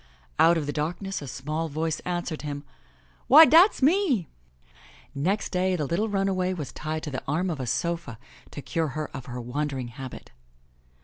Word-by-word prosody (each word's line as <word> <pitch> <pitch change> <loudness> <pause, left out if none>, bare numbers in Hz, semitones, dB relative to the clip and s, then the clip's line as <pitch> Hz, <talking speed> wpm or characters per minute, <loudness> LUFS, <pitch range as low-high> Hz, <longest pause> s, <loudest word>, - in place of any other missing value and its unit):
'* 60 0 -33
Out 170 - +4
of 155 - -2
the 145 - -3
darkness 175 +5 -3
a 140 - -7
small 150 +6 -3
voice 155 +1 -2
answered 175 -3 -3
him,*' 145 -1 -5 0.6
Why 310 +4 +10
dat's 335 0 +6
me 290 - +3 0.4
!" - - -24 0.2
Next 185 +10 -1
day 185 0 +1
the 155 -4 -1
little 195 +9 -1
runaway 195 -2 0
was 150 -6 -5
tied 155 +1 -4
to 150 - -5
the 130 - -4
arm 170 +6 0
of 155 - -4
a 130 - -4
sofa 165 -1 -2 0.3
to 145 - -8
cure 165 -1 -1
her 155 -1 -4
of 135 -1 -7
her 125 -1 -6
wandering 130 +1 -3
habit. 130 +1 -9
160 Hz, 185 wpm, -26 LUFS, 140-185 Hz, 0.6 s, Why